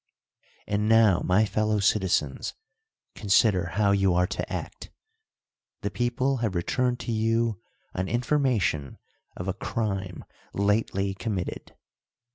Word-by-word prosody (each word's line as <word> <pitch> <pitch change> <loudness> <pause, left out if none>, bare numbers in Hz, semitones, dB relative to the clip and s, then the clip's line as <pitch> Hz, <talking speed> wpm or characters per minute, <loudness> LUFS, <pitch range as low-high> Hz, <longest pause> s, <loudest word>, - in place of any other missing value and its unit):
And 105 +1 0
now, 110 -5 +5
my 100 +4 +3
fellow 110 +1 0
citizens, 95 -9 0 0.6
consider 100 -3 +2
how 100 -1 +2
you 95 -2 +3
are 90 0 +3
to - - -4
act. - - -6 0.9
The - - -2
people 125 +2 0
have 110 -5 -2
returned 125 +8 0
to 120 - -4
you 115 -1 0 0.3
an 95 +1 -2
information 120 - 0 0.4
of 90 - -5
a 95 - 0
crime 95 -5 -3 0.3
lately 100 -1 +1
committed. 95 -3 -5
105 Hz, 115 wpm, -26 LUFS, 95-115 Hz, 0.9 s, now